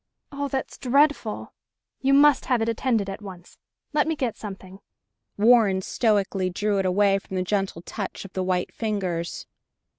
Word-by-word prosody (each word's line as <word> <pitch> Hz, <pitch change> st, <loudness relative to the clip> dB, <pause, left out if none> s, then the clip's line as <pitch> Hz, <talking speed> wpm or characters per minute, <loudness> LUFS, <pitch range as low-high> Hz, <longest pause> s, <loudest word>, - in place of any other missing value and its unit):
"Oh, 285 Hz, 0 st, -3 dB
that's 270 Hz, -1 st, -4 dB
dreadful. 275 Hz, -3 st, +1 dB, 0.5 s
You 275 Hz, +1 st, +3 dB
must 290 Hz, 0 st, +5 dB
have 250 Hz, -3 st, +2 dB
it 225 Hz, -, 0 dB
attended 230 Hz, -2 st, 0 dB
at 195 Hz, +2 st, -6 dB
once. 185 Hz, -4 st, -11 dB, 0.3 s
Let 300 Hz, 0 st, +2 dB
me 320 Hz, -, 0 dB
get 255 Hz, -6 st, -2 dB
something." 195 Hz, -2 st, -9 dB, 0.6 s
Warren 210 Hz, -4 st, +4 dB
stoically 200 Hz, -5 st, +1 dB
drew 205 Hz, +2 st, 0 dB
it 190 Hz, -, +1 dB
away 195 Hz, +1 st, +3 dB
from 190 Hz, -, -9 dB
the 185 Hz, -, 0 dB
gentle 195 Hz, -3 st, -2 dB
touch 200 Hz, 0 st, -6 dB
of 195 Hz, -, -12 dB
the 190 Hz, -, -2 dB
white 185 Hz, -1 st, -1 dB
fingers. 185 Hz, -6 st, -3 dB
205 Hz, 160 wpm, -25 LUFS, 190-245 Hz, 0.6 s, must